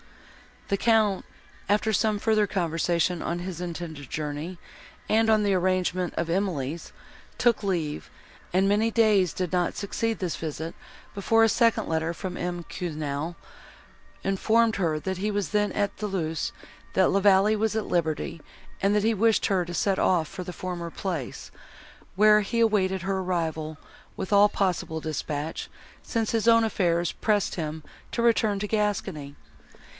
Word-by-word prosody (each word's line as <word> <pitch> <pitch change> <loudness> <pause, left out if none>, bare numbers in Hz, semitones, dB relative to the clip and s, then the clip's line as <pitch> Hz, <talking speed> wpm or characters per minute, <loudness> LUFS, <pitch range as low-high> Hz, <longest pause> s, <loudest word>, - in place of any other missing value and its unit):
The 200 - +1
Count, 215 -3 +2 0.4
after 210 +2 +2
some 215 0 +2
further 215 0 +2
conversation 170 -1 0
on 170 +1 -2
his 175 -1 -5
intended 165 -5 -6
journey 155 +4 -4 0.5
and 225 +1 +3
on 215 -1 +4
the 200 -1 +2
arrangement 185 -1 0
of 170 - -2
Emily's, 170 -5 -2 0.4
took 240 -3 +3
leave; 170 -7 -2 0.4
and 190 +2 +3
many 215 +3 +3
days 215 -6 +3
did 180 -2 -3
not 180 -1 0
succeed 225 +2 -2
this 180 -4 -3
visit, 160 +1 -5 0.4
before 225 +3 +3
a 225 - +5
second 230 +1 +2
letter 160 +1 -1
from 180 +2 -5
M. 175 0 -3
Quesnel 155 -1 -4 0.9
informed 220 +3 +2
her, 165 -5 +1
that 190 +3 -3
he 205 +3 -1
was 205 -4 -1
then 210 -1 +1
at 205 -1 -1
Thoulouse, 175 -7 -2 0.4
that 190 - +4
La 195 - +3
Vallée 200 +2 +4
was 220 0 0
at 220 - -1
liberty, 160 -1 -1 0.4
and 200 +1 +3
that 210 - +2
he 225 +1 +3
wished 225 +1 +3
her 185 -3 +1
to 175 - -7
set 195 +2 +1
off 170 -4 +2
for 190 +1 -7
the 180 - -6
former 175 -2 -5
place, 165 -7 -5 0.6
where 210 +1 +6
he 230 +3 -1
awaited 190 -4 +2
her 190 +1 -1
arrival, 160 -4 -2 0.4
with 190 - -5
all 205 +1 +7
possible 175 -5 -1
dispatch, 155 0 -4 0.3
since 225 -2 -1
his 225 0 0
own 230 0 +6
affairs 175 -5 +1
pressed 210 -3 0
him 155 -2 -4 0.3
to 235 - -1
return 220 -3 +3
to 210 +1 -3
Gascony. 195 -9 -2
190 Hz, 155 wpm, -26 LUFS, 170-210 Hz, 0.9 s, all